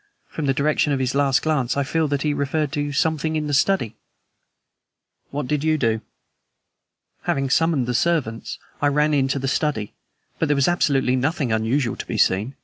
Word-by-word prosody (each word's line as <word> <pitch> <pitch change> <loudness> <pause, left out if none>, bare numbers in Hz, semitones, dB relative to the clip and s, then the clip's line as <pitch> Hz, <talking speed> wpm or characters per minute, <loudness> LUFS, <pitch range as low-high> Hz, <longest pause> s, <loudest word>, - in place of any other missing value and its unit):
From 150 -3 -4
the 135 - +3
direction 150 +1 +1
of 140 - +1
his 130 0 -1
last 140 -1 +2
glance, 140 -5 0
I 140 - +2
feel 155 +2 0
sure 145 - +1
he 150 +1 0
referred 145 +1 -1
to 145 0 -2
something 160 +1 0
in 155 -1 -1
the 145 - -3
study." 145 - +2 1.4
"What 145 0 -3
did 150 0 -1
you 155 0 +2
do?" 115 -5 0 1.2
"Having 135 -1 0
summoned 160 -4 +2
the 125 - -2
servants, 130 -5 -1 0.2
I 145 - +3
ran 150 +1 +2
into 135 -1 +1
the 135 0 -2
study. 135 -6 -1 0.5
But 160 - +1
there 145 - +2
was 140 -1 +2
absolutely 140 -7 +2
nothing 135 -1 -1
unusual 115 +4 0
to - - -6
be - - -3
seen. 105 +8 +1
140 Hz, 185 wpm, -22 LUFS, 130-150 Hz, 1.4 s, the